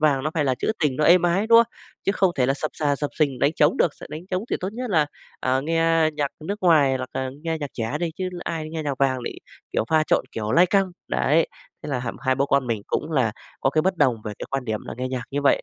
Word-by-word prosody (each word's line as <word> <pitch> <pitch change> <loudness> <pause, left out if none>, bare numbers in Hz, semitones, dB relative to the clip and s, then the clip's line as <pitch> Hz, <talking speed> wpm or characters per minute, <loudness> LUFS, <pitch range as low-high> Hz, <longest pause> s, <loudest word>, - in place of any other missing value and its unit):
vàng 145 -4 +3
nó 155 - -1
phải 150 -3 +1
là 130 -2 +2
trữ - - -1
tình 135 -4 +2
nó 150 - +1
êm 175 +1 +6
ái, 180 +5 +2
đúng 230 0 +7
không? 235 0 +3 0.3
Chứ 195 - +2
không 190 -3 +3
thể 125 -2 +2
là 135 - +2
xập 155 +2 -3
xà 145 -2 0
xập 145 0 -2
xình 140 -5 +1
đánh 140 - +3
trống 150 - +4
được, 160 - +2
s - - -17
đánh 160 +4 -8
trống 185 +3 -1
thì - - +1
tốt 185 - -2
nhất 245 +1 -4
là, 155 -5 +3 0.3
à, 130 +1 +1
nghe 165 +1 +2
nhạc 145 -2 0
nước 200 +5 -3
ngoài 145 -7 +5
hoặc 130 0 -5
là 130 -1 -2
nghe 165 -1 -2
nhạc 145 -3 -5
trẻ 115 +5 -2
đi 170 -2 0
chứ 185 -1 -2 0.2
ai 155 -2 -4
nghe 160 -1 -4
nhạc 140 -3 -3
vàng 135 -2 +2
lại, - - -4 0.4
kiểu, - - +1
pha 160 -1 +4
trộn, - - +2
kiểu, 110 0 -3
lai 175 +5 +6
căng." 195 0 +2 0.2
Đấy, - - +2 0.3
thế - - -6
là 130 -3 -1
h 120 - -4
hai 130 0 +2
bố 140 +1 +1
con 140 -2 +2
mình 115 -3 -2
cũng 160 +2 -2
là 125 -7 +2 0.3
có 135 - +2
cái 155 +2 +2
bất 185 +1 +1
đồng 130 -7 +3
về 105 - -4
cái - - -6
quan 135 -1 -2
điểm 110 -2 -2
là - - -6
nghe 130 - -2
nhạc 130 -1 -3
như 145 +1 -2
vậy. 140 - +3
150 Hz, 290 wpm, -24 LUFS, 130-165 Hz, 0.4 s, đúng